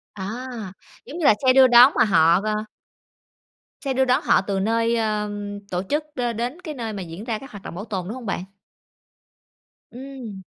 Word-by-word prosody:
À, 215 Hz, +6 st, -5 dB, 0.6 s
giống 305 Hz, -, -8 dB
như 340 Hz, -, -2 dB
là -, -, +7 dB
xe 255 Hz, -, +7 dB
đưa 265 Hz, 0 st, +7 dB
đón 245 Hz, +2 st, +8 dB
mà -, -, +5 dB
họ, 170 Hz, -2 st, +4 dB
ờ 215 Hz, 0 st, -2 dB, 1.2 s
xe 275 Hz, -3 st, -2 dB
đưa 265 Hz, +1 st, +2 dB
đón 255 Hz, 0 st, +2 dB
họ -, -, +4 dB
từ 195 Hz, 0 st, -2 dB
nơi, 230 Hz, +3 st, +1 dB
ờm, 210 Hz, -2 st, -2 dB
tổ 180 Hz, 0 st, -1 dB
chức 300 Hz, +1 st, 0 dB
đ 250 Hz, -, -3 dB, 0.2 s
đến 250 Hz, +9 st, -4 dB
cái 315 Hz, -4 st, -6 dB
nơi 230 Hz, -5 st, -5 dB
mà 200 Hz, -, -5 dB
diễn 170 Hz, +3 st, -8 dB
ra 225 Hz, -2 st, -3 dB
các 270 Hz, -1 st, -12 dB
hoạt 205 Hz, -2 st, -11 dB
động -, -, -8 dB
bảo 200 Hz, +4 st, -6 dB
tồn, 190 Hz, -5 st, -4 dB
đúng 220 Hz, -, -5 dB
hông 255 Hz, -2 st, -9 dB
bạn? 195 Hz, -3 st, -3 dB, 1.5 s
Ừm. 250 Hz, -6 st, -9 dB
220 Hz, 200 wpm, -23 LUFS, 200-255 Hz, 1.5 s, đón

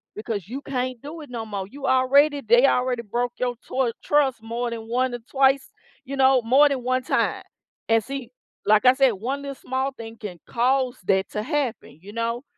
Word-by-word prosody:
Because 215 Hz, -4 st, -4 dB
you 260 Hz, +6 st, -6 dB
can't 255 Hz, -3 st, -3 dB
do 310 Hz, +3 st, -8 dB
it 295 Hz, -, -11 dB
no 230 Hz, -2 st, -5 dB
more. 200 Hz, -3 st, -5 dB
You 275 Hz, +5 st, -8 dB
already 280 Hz, +3 st, +4 dB
they 240 Hz, +4 st, +6 dB
already 250 Hz, -2 st, +1 dB
broke 240 Hz, +3 st, -2 dB
your 245 Hz, -1 st, -1 dB
toy 255 Hz, -3 st, 0 dB
trust 275 Hz, -6 st, +2 dB
more 235 Hz, +2 st, -3 dB
than 225 Hz, -1 st, -6 dB
1 250 Hz, +1 st, 0 dB
or 240 Hz, -, -4 dB
twice, 270 Hz, 0 st, +3 dB, 0.4 s
you 275 Hz, -, -5 dB
know, 265 Hz, -1 st, +4 dB
more 275 Hz, +6 st, +5 dB
than 265 Hz, -3 st, -2 dB
1 255 Hz, +1 st, 0 dB
time. -, -, 0 dB, 0.5 s
And 225 Hz, 0 st, +4 dB
see, 270 Hz, -3 st, -6 dB, 0.4 s
like 215 Hz, +3 st, +4 dB
I 255 Hz, -, +8 dB
said, 265 Hz, -1 st, +4 dB
1 245 Hz, +8 st, -4 dB
little 280 Hz, -1 st, -6 dB
small 265 Hz, +2 st, -2 dB
thing 230 Hz, -3 st, -10 dB
can 195 Hz, -6 st, -8 dB
cause 255 Hz, +1 st, +1 dB
that 190 Hz, 0 st, +2 dB
to 210 Hz, 0 st, -3 dB
happen, 270 Hz, -, -3 dB
you 205 Hz, +2 st, -11 dB
know? 230 Hz, +2 st, -2 dB
250 Hz, 200 wpm, -24 LUFS, 230-270 Hz, 0.5 s, I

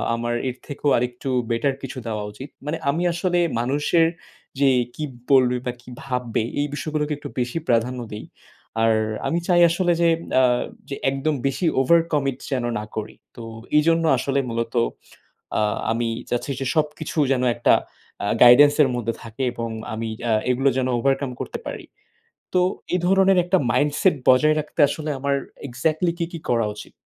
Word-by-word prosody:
আমার 120 Hz, 0 st, -2 dB, 0.2 s
এর 125 Hz, -, -5 dB
থেকেও 145 Hz, 0 st, -1 dB
আরেকটু 125 Hz, +2 st, -3 dB, 0.2 s
better 115 Hz, +4 st, +1 dB
কিছু 135 Hz, 0 st, -6 dB
দেওয়া 105 Hz, -2 st, -3 dB
উচিত। 130 Hz, +7 st, -10 dB, 0.2 s
মানে 150 Hz, +3 st, -2 dB
আমি 160 Hz, +5 st, 0 dB
আসলে 175 Hz, +1 st, 0 dB, 0.2 s
মানুষের 145 Hz, +6 st, +2 dB, 0.5 s
যে 140 Hz, -1 st, +5 dB, 0.3 s
কি 155 Hz, -, -5 dB, 0.3 s
বলবে 125 Hz, -2 st, +5 dB
বা 125 Hz, -, 0 dB
কি 125 Hz, -, -14 dB
ভাববে, 125 Hz, -4 st, -2 dB, 0.2 s
এই 145 Hz, -, +1 dB
বিষয়গুলোকে 150 Hz, 0 st, -2 dB
একটু 145 Hz, -, -8 dB
বেশি 125 Hz, +4 st, -2 dB
প্রাধান্য 120 Hz, +2 st, +1 dB
দেই। 105 Hz, -, -7 dB, 0.6 s
আর 115 Hz, 0 st, +4 dB, 0.3 s
আমি 170 Hz, -, 0 dB
চাই 175 Hz, -1 st, +4 dB
আসলে 175 Hz, +1 st, +1 dB
যে 170 Hz, -, +5 dB, 0.3 s
আ -, -, +4 dB, 0.5 s
যে 140 Hz, -, -3 dB
একদম 135 Hz, +3 st, -1 dB
বেশি 135 Hz, +6 st, -2 dB, 0.2 s
overcommit 150 Hz, -3 st, +2 dB
যেন 130 Hz, -3 st, 0 dB, 0.2 s
না 105 Hz, -, -6 dB
করি। 110 Hz, 0 st, -5 dB, 0.2 s
তো 120 Hz, -, -8 dB, 0.3 s
এজন্য 165 Hz, +2 st, +3 dB
আসলে 140 Hz, +2 st, 0 dB
মূলত 115 Hz, 0 st, -3 dB, 0.9 s
আ -, -, +2 dB, 0.3 s
আমি 115 Hz, 0 st, -1 dB, 0.2 s
চাচ্ছি 120 Hz, +3 st, -2 dB
যে 135 Hz, -, -2 dB
সবকিছু 155 Hz, +1 st, -2 dB
যেন 130 Hz, -2 st, 0 dB
একটা 120 Hz, -, +3 dB, 0.5 s
আ -, -, -1 dB, 0.2 s
guidance 140 Hz, +4 st, +8 dB
এর 140 Hz, -, +3 dB
মধ্যে 115 Hz, -2 st, -1 dB
থাকে 115 Hz, +3 st, -7 dB
এবং 115 Hz, 0 st, -4 dB, 0.2 s
আমি 110 Hz, +1 st, -3 dB, 0.2 s
আ -, -, +3 dB, 0.2 s
এগুলো 130 Hz, +2 st, +2 dB
যেন 130 Hz, -, +1 dB
overcome 135 Hz, 0 st, 0 dB
করতে -, -, -4 dB
পারি। -, -, -6 dB, 0.7 s
তো 180 Hz, -, +4 dB, 0.3 s
এই -, -, +2 dB
ধরনের 195 Hz, 0 st, +4 dB
একটা 180 Hz, +2 st, +2 dB
mindset 150 Hz, +5 st, +2 dB
বজায় 150 Hz, +4 st, +5 dB
রাখতে 155 Hz, +2 st, -6 dB
আসলে 155 Hz, +1 st, -4 dB
আমার 140 Hz, +1 st, 0 dB, 0.3 s
exactly 155 Hz, +7 st, 0 dB
কি 170 Hz, -, 0 dB
কি 170 Hz, -, -5 dB
করা 115 Hz, -2 st, +2 dB
উচিত? -, -, -10 dB
135 Hz, 165 wpm, -23 LUFS, 120-155 Hz, 0.9 s, guidance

